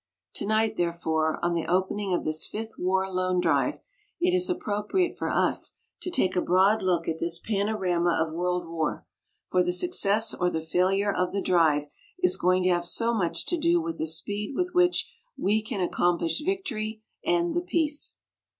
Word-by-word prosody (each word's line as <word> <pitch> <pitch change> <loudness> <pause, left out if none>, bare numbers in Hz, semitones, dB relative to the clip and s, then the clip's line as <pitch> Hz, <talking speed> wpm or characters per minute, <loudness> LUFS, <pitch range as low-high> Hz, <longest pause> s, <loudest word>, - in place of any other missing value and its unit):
Tonight, 220 +1 +1
therefore, 160 -2 0
on 175 - +1
the 165 -1 -2
opening 190 +3 0
of 175 - 0
this 155 0 0
Fifth 220 +1 -7
War 190 +1 +1
Loan 185 -1 0
Drive, 145 -7 +1 0.4
it 360 +1 +2
is 365 0 +2
appropriate 225 - -1
for - - -3
us - - +1 0.3
to 360 - -3
take 190 - +1
a 180 - +2
broad 190 +5 +3
look 175 -3 0
at 160 0 -2
this 170 0 -1
panorama 190 -4 0
of 160 -1 -1
world 180 0 -1
war, 160 -2 -3 0.5
for 180 - +4
the 180 0 +1
success 220 - +1
or 180 - 0
the 160 - -2
failure 190 +5 +1
of 180 0 0
the 200 - 0
drive 160 -6 +3 0.3
is 365 0 +2
going 185 +1 +2
to 185 - +3
have 175 -1 +2
so 230 +6 +3
much 180 -7 -1
to 350 - 0
do 340 +2 +3
with 330 0 -4
the 160 - -1
speed 205 - -2
with 360 0 -1
which 355 0 +3 0.3
we 210 +3 +1
can 215 -2 -4
accomplish 175 - +1
victory 230 - -3 0.2
and 345 0 +1
the 345 - 0
peace. 315 -4 0
190 Hz, 180 wpm, -27 LUFS, 175-225 Hz, 0.5 s, for